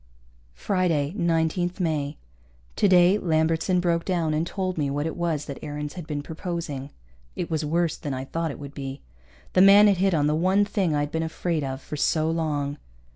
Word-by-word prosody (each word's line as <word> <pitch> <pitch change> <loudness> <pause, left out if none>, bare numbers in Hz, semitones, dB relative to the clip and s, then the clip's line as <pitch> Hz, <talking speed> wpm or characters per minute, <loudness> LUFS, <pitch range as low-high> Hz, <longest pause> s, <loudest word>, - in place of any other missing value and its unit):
Friday, 165 - 0
19 170 -1 +1
May. 155 -5 -1 0.6
Today 185 +1 +5
Lambertson 165 +1 +1
broke 170 -1 +1
down 170 -4 0
and 160 +2 0
told 185 -1 -2
me 145 -3 -1
what 145 +2 -2
it 160 - -3
was 165 -4 -1
that 140 - -7
Aarons 150 0 -5
had 175 -4 -8
been 145 -2 -3
proposing. 160 -4 -5 0.5
It 170 - -4
was 160 -1 0
worse 165 +2 0
than 145 - -5
I 130 0 -4
thought 165 +3 -2
it 140 - -6
would 140 -1 -9
be. 135 -1 -6 0.5
The 185 - +5
man 200 +2 +8
had 200 -3 +4
hit 190 -1 +2
on 145 -2 +2
the 150 - +2
one 185 +6 +3
thing 195 -6 0
I'd 145 0 -1
been 160 - -1
afraid 160 0 -2
of 135 0 -4
for 150 - -6
so 155 +2 +1
long. 150 -3 -2
160 Hz, 190 wpm, -25 LUFS, 150-180 Hz, 0.6 s, man